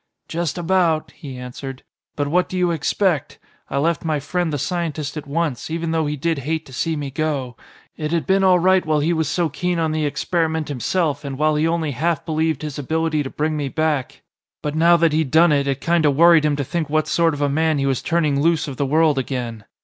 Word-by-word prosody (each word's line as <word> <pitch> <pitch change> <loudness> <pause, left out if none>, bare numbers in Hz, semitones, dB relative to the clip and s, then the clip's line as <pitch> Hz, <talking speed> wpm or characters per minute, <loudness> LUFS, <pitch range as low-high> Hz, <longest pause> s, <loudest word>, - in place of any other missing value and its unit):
"Just 170 -1 -2
about," 175 -2 +1
he 135 -6 -9
answered. 125 +1 -8 0.3
"But 145 -1 -1
what 180 +5 +1
do 185 - -4
you 180 -1 +2
expect? 165 0 0 0.3
I - - -2
left 165 +4 0
my 155 -2 0
friend 175 +3 -2
the 145 - -1
scientist 155 -2 -3
at 150 -2 -6
once, 150 -3 -2
even 165 0 -2
though 160 -2 0
he 150 - -2
did 160 +1 -1
hate 155 +4 -3
to 130 - -14
see 160 +5 -1
me 145 -2 -4
go. 140 -4 -2 0.4
It 155 -1 -3
had 170 -1 0
been 195 0 +2
all 185 -1 +5
right 185 +1 +3
while 155 -1 +1
he 165 +4 +1
was 160 -3 0
so 170 +1 +1
keen 175 +4 -2
on 160 -1 0
the 155 -1 0
experiment 160 0 -1
himself 145 +2 -1
and 135 -2 -5
while 155 +1 +2
he 155 +2 +2
only 165 -2 0
half 160 +4 -1
believed 160 -2 -1
his 150 -1 -5
ability 160 +2 0
to 135 - -4
bring 155 +2 -1
me 145 -2 -2
back. 155 -3 -2 0.4
But 150 - -2
now 170 +2 +5
that 165 -2 +2
he'd 155 -3 +1
done 160 +3 +5
it, 140 -1 +2
it 140 -1 -1
kinda 170 -3 +2
worried 165 +2 +5
him 150 -1 +2
to 140 - -2
think 160 +2 -3
what 155 +1 +1
sort 165 -2 +2
of 145 - -6
a - - +3
man 155 +2 +1
he 135 - 0
was 135 -2 0
turning 155 -5 +1
loose 165 0 +2
of 135 -3 -6
the 140 - 0
world 155 0 +3
again. 120 -5 -4
155 Hz, 235 wpm, -21 LUFS, 145-165 Hz, 0.4 s, all